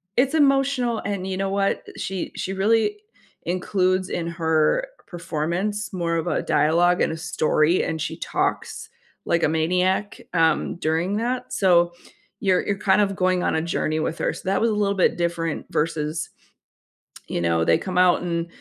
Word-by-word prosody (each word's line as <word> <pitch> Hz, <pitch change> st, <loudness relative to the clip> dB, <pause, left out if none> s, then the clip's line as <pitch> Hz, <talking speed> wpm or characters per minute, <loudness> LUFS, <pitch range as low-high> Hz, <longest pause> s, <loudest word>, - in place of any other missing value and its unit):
It's 265 Hz, +4 st, +2 dB
emotional, 270 Hz, -5 st, +2 dB
and 195 Hz, -2 st, -3 dB
you 190 Hz, -, -2 dB
know 195 Hz, 0 st, -1 dB
what? 195 Hz, 0 st, 0 dB
She 190 Hz, -1 st, -4 dB
she 190 Hz, -, -3 dB
really 225 Hz, -, +1 dB, 0.4 s
includes 185 Hz, +1 st, 0 dB
in 170 Hz, -1 st, -3 dB
her 165 Hz, -, +1 dB, 0.2 s
performance, 175 Hz, +6 st, -3 dB
more 170 Hz, -2 st, -1 dB
of 165 Hz, -, -2 dB
a -, -, 0 dB
dialogue 170 Hz, +4 st, +2 dB
and -, -, +2 dB
a 160 Hz, -, -4 dB
story, 155 Hz, +1 st, +1 dB
and 160 Hz, -1 st, -3 dB
she -, -, -3 dB
talks 440 Hz, -, -2 dB, 0.4 s
like 170 Hz, 0 st, +1 dB
a -, -, +5 dB
maniac, 180 Hz, +5 st, 0 dB
um, 165 Hz, 0 st, +2 dB
during 170 Hz, +5 st, 0 dB
that, 250 Hz, +2 st, -2 dB
so 175 Hz, -3 st, +4 dB, 0.5 s
you're 190 Hz, -3 st, +2 dB
you're 200 Hz, -1 st, -1 dB
kind 205 Hz, 0 st, +3 dB
of 195 Hz, -1 st, 0 dB
going 185 Hz, -1 st, +1 dB
on -, -, +1 dB
a 160 Hz, -, +1 dB
journey 155 Hz, -2 st, -1 dB
with 160 Hz, +1 st, -2 dB
her. -, -, 0 dB
So, -, -, -10 dB
that 195 Hz, -, +1 dB
was 230 Hz, -, +3 dB
a -, -, 0 dB
little 200 Hz, -1 st, +1 dB
bit 180 Hz, -, +2 dB
different 170 Hz, -2 st, -2 dB
versus, 155 Hz, +1 st, -1 dB, 1.0 s
you 85 Hz, -, -2 dB
know, 85 Hz, -1 st, +1 dB
they 85 Hz, -, +4 dB
come 185 Hz, -1 st, -4 dB
out 180 Hz, -1 st, +4 dB
and 170 Hz, -1 st, -2 dB
180 Hz, 175 wpm, -23 LUFS, 165-200 Hz, 1.0 s, a